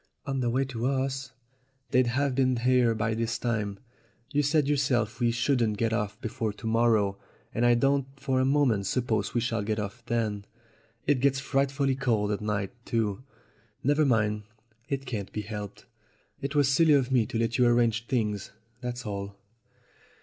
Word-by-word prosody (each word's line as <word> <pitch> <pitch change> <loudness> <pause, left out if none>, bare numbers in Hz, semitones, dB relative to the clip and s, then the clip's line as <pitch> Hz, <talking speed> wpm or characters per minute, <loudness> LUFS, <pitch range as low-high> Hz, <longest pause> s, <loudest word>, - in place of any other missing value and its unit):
"On 135 -1 -2
the 120 -2 +1
way 130 +3 +1
to 125 -2 -3
us? 135 -1 -1 0.6
They'd 125 -1 +4
have 135 +3 +1
been 130 -1 +2
here 125 -1 +3
by 110 +1 0
this 115 +1 -1
time. 105 -4 -2 0.6
You 145 - +3
said 145 0 +2
yourself 135 -6 +1
we 120 -1 +3
shouldn't 115 -2 +1
get 115 0 0
off 105 -3 -2
before 110 -1 -2
to 110 - -12
morrow, 110 -3 +2 0.3
and 120 +2 +2
I 120 - +5
don't 135 +2 +2
for 135 -2 0
a - - +3
moment 130 -8 +2
suppose 120 -3 -1
we 120 - +2
shall 115 -2 -1
get 105 +1 -1
off 105 +3 -5
then. 110 -3 -1 0.6
It 145 -3 +3
gets 135 +1 +2
frightfully 135 0 +1
cold 110 -6 0
at 105 - -2
night 105 -2 -2
too. 110 -3 -1 0.6
Never 145 +3 +3
mind; 105 -5 +2 0.5
it 135 -1 -2
can't 110 -6 -4
be 105 - -3
helped. 105 -1 -7 0.6
It 140 +2 -3
was 145 -2 +4
silly 160 +1 +5
of 135 -2 +2
me 120 -4 +3
to - - -3
let 115 +2 0
you 125 - +5
arrange 120 -1 +2
things, 105 -6 -1 0.3
that's 125 0 -5
all." 100 -1 -5
120 Hz, 175 wpm, -28 LUFS, 110-135 Hz, 0.6 s, I